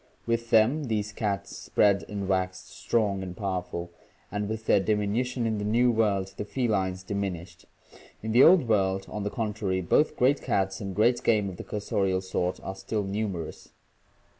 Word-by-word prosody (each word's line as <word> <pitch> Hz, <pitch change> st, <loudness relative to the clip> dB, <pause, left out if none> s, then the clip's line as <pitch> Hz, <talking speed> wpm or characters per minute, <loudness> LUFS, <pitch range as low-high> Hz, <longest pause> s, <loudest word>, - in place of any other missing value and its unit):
With 115 Hz, 0 st, -1 dB
them, 125 Hz, +8 st, +4 dB
these 105 Hz, -3 st, -2 dB
cats 100 Hz, -2 st, -3 dB
spread 100 Hz, -1 st, +2 dB
and 100 Hz, -2 st, -4 dB
waxed 95 Hz, -1 st, -1 dB
strong 105 Hz, -4 st, 0 dB
and 90 Hz, -1 st, -7 dB
powerful, 90 Hz, -3 st, -3 dB, 0.4 s
and 105 Hz, 0 st, -2 dB
with 110 Hz, 0 st, -4 dB
their 105 Hz, -, +4 dB
diminution 110 Hz, +5 st, 0 dB
in 110 Hz, -2 st, 0 dB
the -, -, -3 dB
New 120 Hz, +4 st, +3 dB
World 100 Hz, -4 st, +1 dB
the -, -, -2 dB
felines 95 Hz, -6 st, -1 dB
diminished. 95 Hz, -4 st, -4 dB, 0.6 s
In 110 Hz, -, -2 dB
the 120 Hz, +3 st, +6 dB
Old 165 Hz, -4 st, +7 dB
World, 95 Hz, -3 st, +1 dB
on 105 Hz, -, -5 dB
the 105 Hz, -, -2 dB
contrary, 105 Hz, -5 st, -2 dB
both 150 Hz, -, +2 dB
great 135 Hz, +3 st, +3 dB
cats 95 Hz, +1 st, -1 dB
and 100 Hz, -2 st, -5 dB
great 120 Hz, +3 st, +3 dB
game 105 Hz, -4 st, +2 dB
of 90 Hz, -, -8 dB
the -, -, -6 dB
cursorial 95 Hz, -2 st, -1 dB
sort 90 Hz, -1 st, -2 dB
are 95 Hz, -, -4 dB
still 95 Hz, +2 st, -3 dB
numerous. 95 Hz, -4 st, -4 dB
105 Hz, 170 wpm, -27 LUFS, 95-110 Hz, 0.6 s, Old